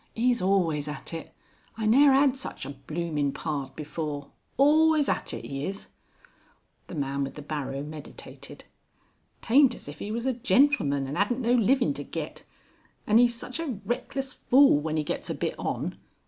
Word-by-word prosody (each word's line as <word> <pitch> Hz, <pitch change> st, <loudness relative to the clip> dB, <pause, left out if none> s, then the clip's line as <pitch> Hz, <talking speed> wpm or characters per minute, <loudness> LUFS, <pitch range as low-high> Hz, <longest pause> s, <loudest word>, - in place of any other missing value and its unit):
'E's 240 Hz, -1 st, +2 dB
always 175 Hz, -6 st, +1 dB
at 150 Hz, +2 st, -6 dB
it. 165 Hz, -, -6 dB, 0.5 s
I 220 Hz, -, -2 dB
ne'er 275 Hz, +6 st, +6 dB
'ad 270 Hz, 0 st, +4 dB
such 265 Hz, -, -6 dB
a -, -, -5 dB
blooming 150 Hz, -1 st, -2 dB
pard 140 Hz, -3 st, -4 dB
before. 150 Hz, -2 st, -5 dB, 0.3 s
Always 305 Hz, +1 st, +5 dB
at -, -, -1 dB
it, -, -, -6 dB
'e 135 Hz, +1 st, -4 dB
is." 195 Hz, +1 st, -6 dB, 1.0 s
The -, -, -8 dB
man 140 Hz, -1 st, -1 dB
with 135 Hz, -, -5 dB
the 150 Hz, -, -8 dB
barrow 140 Hz, -2 st, -4 dB
meditated. 150 Hz, 0 st, -10 dB, 0.8 s
"Taint 260 Hz, +1 st, +5 dB
as -, -, -12 dB
if 145 Hz, 0 st, -9 dB
'e 210 Hz, -, -4 dB
was 230 Hz, +2 st, -3 dB
a 265 Hz, -, +1 dB
gentleman 245 Hz, -, +2 dB
and 135 Hz, +2 st, -5 dB
'adnt 205 Hz, +4 st, +1 dB
no 240 Hz, 0 st, +2 dB
livin' 250 Hz, +3 st, +3 dB
to -, -, -5 dB
get. -, -, -6 dB, 0.6 s
An' 215 Hz, +2 st, +5 dB
'e's 240 Hz, -1 st, +4 dB
such 255 Hz, +5 st, -6 dB
a 275 Hz, -11 st, -3 dB
reckless 265 Hz, +4 st, -3 dB
fool 265 Hz, -, +5 dB
when 155 Hz, +1 st, -2 dB
'e 155 Hz, -, +1 dB
gets -, -, -4 dB
a -, -, -2 dB
bit -, -, -2 dB
on. -, -, -3 dB
200 Hz, 175 wpm, -27 LUFS, -, 1.0 s, ne'er